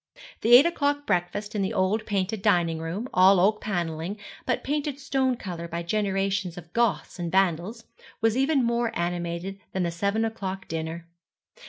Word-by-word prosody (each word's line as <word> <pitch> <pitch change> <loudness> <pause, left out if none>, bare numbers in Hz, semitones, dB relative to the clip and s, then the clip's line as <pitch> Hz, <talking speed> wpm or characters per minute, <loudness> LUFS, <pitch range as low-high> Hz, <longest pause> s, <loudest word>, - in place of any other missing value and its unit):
The 235 +2 +7
eight 265 +5 +9
o'clock 290 -4 0
breakfast 205 +1 -1
in 210 - -1
the 190 - -1
old 190 +4 +1
painted 200 0 -1
dining 175 -5 +2
room 170 +9 -4
all 185 +1 +6
oak 210 +4 +3
panelling, 175 -1 -3 0.3
but 250 - 0
painted 290 0 -2
stone 265 -2 0
colour 170 -5 -6
by 170 +1 -4
generations 195 -2 -1
of 170 -1 -11
Goths 235 -5 0
and 170 -1 -3
Vandals 190 +4 +1 0.4
was 225 0 +2
even 270 +1 +2
more 235 0 +1
animated 175 +2 -3
than 190 - 0
the 170 - -1
seven 200 +6 0
o'clock 195 -4 -4
dinner. 165 +1 -4
195 Hz, 165 wpm, -26 LUFS, 175-225 Hz, 0.4 s, eight